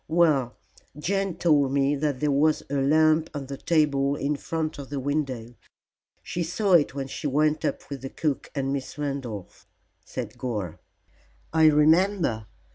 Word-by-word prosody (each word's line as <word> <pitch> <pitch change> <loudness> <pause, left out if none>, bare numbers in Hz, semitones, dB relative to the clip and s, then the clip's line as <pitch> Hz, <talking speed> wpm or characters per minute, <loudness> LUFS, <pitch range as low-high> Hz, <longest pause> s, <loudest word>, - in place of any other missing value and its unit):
Well, 155 -7 +2 0.4
Jane 195 +3 -1
told 145 -6 +3
me 140 +1 +2
that 145 -2 -2
there 150 -1 +2
was 150 +2 +2
a 140 -1 +1
lamp 155 +3 +3
on 140 -1 -4
the 140 +1 -6
table 145 -4 +2
in 145 0 -1
front 160 +1 -3
of 140 - -8
the 140 -1 -3
window. 130 -4 -2 0.7
She 175 - -4
saw 180 +4 0
it 150 -5 +4
when 135 -1 -3
she 145 - -4
went 150 +2 +1
up - - -2
with 140 -3 -6
the 135 - -5
cook 150 -1 -2
and 135 -1 -1
Miss 135 0 -5
Randolph." 135 -9 -5 1.9
"I 160 -1 +5
remember. 155 - +3
145 Hz, 150 wpm, -26 LUFS, 135-155 Hz, 1.9 s, I